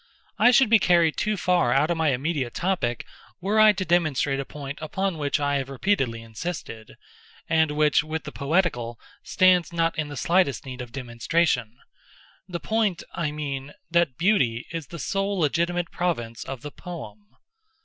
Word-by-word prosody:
I - - +7
should 250 -2 +5
be 225 - +7
carried 170 -4 +3
too 215 -1 -1
far 180 -8 +2
out 140 +6 +3
of 170 - 0
my 160 -1 +2
immediate 135 -1 -1
topic 170 - -1 0.3
were 200 +4 +1
I 215 0 +8
to 185 -1 -3
demonstrate 155 -5 +1
a 135 - -3
point 145 0 -7
upon 180 +2 -2
which 145 +1 0
I 145 -1 +1
have 135 -1 -4
repeatedly 135 - -1
insisted, 115 -2 -7 0.5
and 160 -1 +3
which, 150 0 +3
with 155 0 -4
the - - -7
poetical, 140 -7 -1 0.2
stands 180 -2 +3
not 165 -1 0
in 155 - -1
the 145 -1 -8
slightest 170 -5 +1
need 130 -1 -7
of 120 -2 -8
demonstration—the 125 - -3
point, 215 -5 0
I 165 -3 -1
mean, 145 -2 -5 0.2
that 170 -7 +2
Beauty 130 - +2
is 165 -4 -5
the 170 - -8
sole 195 +5 -1
legitimate 170 +2 0
province 120 -11 -2
of 135 -2 -6
the 150 - -6
poem. 110 - -10
155 Hz, 165 wpm, -25 LUFS, 135-175 Hz, 0.5 s, I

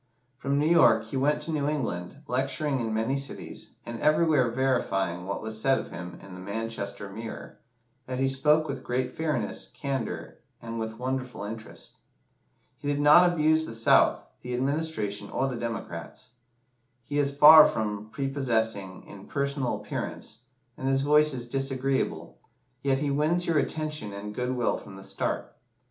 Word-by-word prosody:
From 140 +2 -1
New 145 - +2
York 170 +2 +5
he - - -7
went 145 +3 +2
to 165 - -2
New 145 -2 0
England, 130 - -3
lecturing 135 +2 -1
in 115 -2 -2
many 110 +5 0
cities, 140 0 -6
and 115 -1 -6
everywhere 155 -4 +3
verifying 95 -9 0
what 100 - -3
was 110 0 -4
said 135 +1 +3
of - - -6
him 90 +1 -8
in 95 -1 -11
the 90 - -9
"Manchester 100 0 -4
Mirror," 110 +3 -8 0.5
that 130 0 -3
he 135 +1 +2
spoke 150 +4 +3
with 140 -2 -5
great 125 +1 -2
fairness, 160 -1 -2
candour, 135 -5 -4 0.2
and 115 0 -6
with 110 0 -4
wonderful 130 -3 -3
interest. 110 +1 -8 0.8
"He 145 - -7
did 145 0 0
not 150 +5 +7
abuse 160 -1 +2
the 115 - -6
South, 115 - +4 0.2
the 125 0 -4
Administration, 130 -7 -2
or 135 - 0
the 135 -2 -2
Democrats. 115 -1 -6 0.7
He 145 +4 -2
is 140 -1 0
far 155 +1 +10
from 105 -1 -3
prepossessing 115 -8 -1
in 100 -1 -12
personal 140 -4 -1
appearance, 105 +1 -5 0.4
and 130 - -3
his 135 0 +2
voice 150 +1 +5
is 120 -3 -4
disagreeable, 135 +1 -1 0.4
yet 135 -1 +2
he 145 +1 -1
wins 155 +5 +1
your 165 -3 +2
attention 150 -11 -2
and 105 +1 -6
good 125 +2 -2
will 120 -1 +1
from 95 - -11
the 95 - -11
start. - - -3
130 Hz, 160 wpm, -27 LUFS, 110-145 Hz, 0.8 s, far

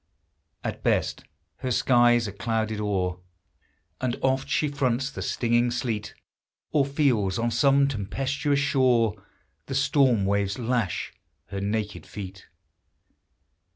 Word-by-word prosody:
At - - -4
best - - 0 0.3
her 130 - -3
skies 120 -1 +4
are - - -4
clouded 110 0 -2
o'er, 90 -3 -1 0.8
And 125 -2 -1
oft 130 0 +1
she 155 - +1
fronts 135 -1 0
the - - -7
stinging 120 0 +1
sleet, 120 -3 -3 0.6
Or 145 -3 +3
feels 125 -10 +1
on 115 +1 0
some 140 +4 +4
tempestuous 135 +5 -1
shore 130 -6 +3 0.5
The 135 - -3
storm 135 -6 +3
waves 100 0 0
lash 120 -4 -1 0.4
her 100 - -4
naked 105 +1 -3
feet. 95 -2 -8
120 Hz, 120 wpm, -26 LUFS, 105-135 Hz, 0.8 s, skies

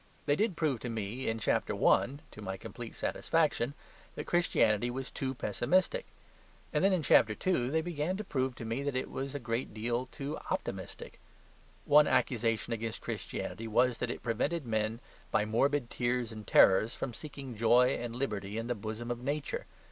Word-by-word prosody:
They 145 - +3
did 210 +2 +1
prove 150 -7 +1
to 120 - -5
me 115 +3 -3
in 115 - -1
Chapter 110 - 0
I. - - +4 0.2
(to 110 - -11
my 95 -1 -4
complete 120 +2 -8
satisfaction) 150 -5 +1 0.4
that - - -5
Christianity 120 - +2
was 130 +2 -4
too 135 -1 -3
pessimistic; 185 - +1 0.7
and - - +2
then, 195 - +5
in 180 -4 +1
Chapter 110 -4 +5
II., 150 -10 +2
they 160 +3 +2
began 175 +2 -2
to 215 - -4
prove 130 -7 -1
to 115 - -7
me 115 +4 -2
that 140 -1 -2
it 130 - -2
was 135 +1 -4
a - - -2
great 115 -2 -3
deal 120 +3 -1
too 140 +3 -5
optimistic. - - -4 0.7
One 150 +1 +7
accusation 115 -2 +1
against 115 0 -4
Christianity 115 - -4
was 120 +2 +2
that 125 - -1
it - - -5
prevented 140 +7 0
men, 110 0 -1 0.3
by 105 - +2
morbid 125 +4 +1
tears 120 -1 0
and 110 -2 -9
terrors, 110 +5 +6
from 125 - -4
seeking 140 -2 -8
joy 120 +3 +5
and 120 -1 -4
liberty 105 -5 -3
in 115 - -2
the 120 - 0
bosom 110 +2 -5
of 120 0 -4
Nature. 145 +1 -2
120 Hz, 180 wpm, -32 LUFS, 115-145 Hz, 0.7 s, One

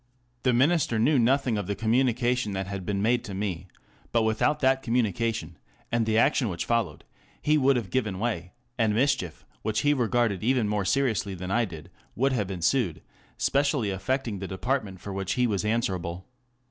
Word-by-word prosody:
The 125 - +3
Minister 135 0 +2
knew 130 +5 +3
nothing 125 -2 +2
of 100 - -4
the 100 - -1
communication 120 0 +1
that 95 0 -2
had 95 -1 -6
been 100 -1 -1
made 120 +2 +2
to 100 - -6
me, 95 -3 -3 0.4
but 115 -1 +2
without 110 +7 +1
that 130 0 +3
communication, 115 -7 -1 0.3
and 115 -1 +1
the 110 0 +2
action 130 0 +3
which 85 -2 -3
followed, 115 -2 -1 0.4
he 150 - +2
would 140 -2 +4
have 110 -7 -3
given 110 -7 -1
way, 95 -5 -3 0.3
and 110 -2 +2
mischief, 115 - 0 0.2
which 110 0 -1
he 145 0 +3
regarded 120 -6 +1
even 125 -2 +2
more 105 -1 -1
seriously 110 -6 0
than 90 +1 -5
I 120 +3 +2
did, 80 -6 -10 0.2
would 135 +3 +1
have 105 -6 -1
ensued, 90 - 0 0.3
specially 140 -6 +1
affecting 115 +2 -2
the 95 - -5
department 100 -1 -2
for 100 - -7
which 95 0 -2
he 125 - +2
was 105 -5 0
answerable. 95 -6 -2
110 Hz, 180 wpm, -27 LUFS, 95-125 Hz, 0.4 s, would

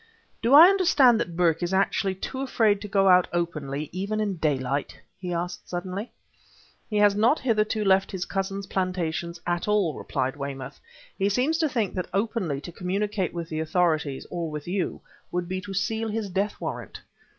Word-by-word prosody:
"Do 235 +4 +5
I 315 +3 +12
understand 335 - +5
that 175 -7 -3
Burke 165 -2 +2
is 175 +2 0
actually 195 0 +1
too 260 +7 -5
afraid 220 -6 +2
to 210 - -5
go 195 -1 +3
out 180 -1 +6
openly 155 -4 -2
even 200 +4 -2
in 205 -4 -1
daylight?" 140 -3 -1 0.2
he 180 -2 -5
asked 175 +1 -4
suddenly. 185 +5 -4 0.8
"He 210 - -1
has 205 -1 +5
not 225 +9 +3
hitherto 215 -3 0
left 190 0 +4
his 185 -2 -3
cousin's 195 0 -3
plantations 175 -3 -2
at 175 +1 -1
all," 205 -6 +2
replied 130 -1 -2
Weymouth. 140 -2 -6 0.4
"He 195 +1 +2
seems 265 +10 +1
to 315 -2 +2
think 230 -7 -1
that 180 -2 -3
openly 195 - -1
to 175 - -8
communicate 190 +2 -2
with 170 -1 -5
the 155 - -3
authorities, 160 -4 0
or 170 -2 -3
with 150 0 -6
you, 185 +1 -2 0.3
would 175 0 -2
be 185 +1 -3
to 195 +1 -7
seal 220 +3 -1
his 210 -2 -3
death 200 +3 -1
warrant." - - -6
190 Hz, 180 wpm, -26 LUFS, 170-210 Hz, 0.8 s, I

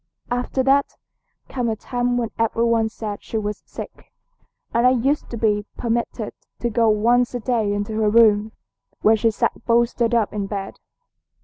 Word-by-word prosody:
After 245 +2 -1
that 275 +1 +2 0.5
came 245 -3 -2
a 220 - -1
time 245 +2 -1
when 235 -2 -2
every 230 0 +1
one 230 -1 +2
said 215 -2 -6
she 225 - -4
was 210 -1 -3
sick, - - -10 0.6
and 235 +2 +4
I - - +7
used 260 +4 0
to 235 - -5
be 210 -2 +1
permitted 235 -1 -2 0.2
to 240 - -1
go 225 0 +3
once 240 +4 +2
a - - -1
day 225 -3 0
into 205 +1 -2
her 215 - +3
room, 215 -1 +4 0.5
where 220 +1 +6
she 225 +1 +2
sat 225 - -1
bolstered 235 0 +2
up 225 -3 +1
in 205 -2 -2
bed. 195 -1 -5
230 Hz, 175 wpm, -22 LUFS, 215-245 Hz, 0.6 s, I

